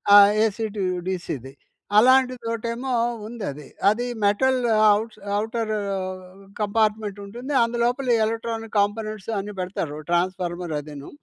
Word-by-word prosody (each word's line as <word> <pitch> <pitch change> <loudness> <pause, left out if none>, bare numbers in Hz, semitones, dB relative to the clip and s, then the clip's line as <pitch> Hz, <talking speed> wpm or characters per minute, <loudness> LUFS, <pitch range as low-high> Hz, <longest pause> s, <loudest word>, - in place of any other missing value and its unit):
ఆ! - - +12 0.3
AC 220 +1 -1
to 200 - 0 0.2
డీసీది 140 -8 -4 0.4
అలాంటిదొటేమో 240 0 +2 0.4
ఉందది. 200 -11 -6 0.2
అది 230 +4 0 0.2
metal 255 +6 +3 0.4
outs 220 +1 -6 0.2
outer 220 0 -1 0.8
కంపార్ట్మెంటుంటుంది, 210 +3 -1
అందులోపల 240 +3 0 0.2
electronic 225 0 -4
components 215 0 -1
అన్నీ 205 +1 -6
బెడతారు. 180 -5 -3
ట్రాన్స్‌ఫార్మర్ 175 -1 -1
అదీను. 145 -1 -9
215 Hz, 95 wpm, -24 LUFS, 190-230 Hz, 0.8 s, ఆ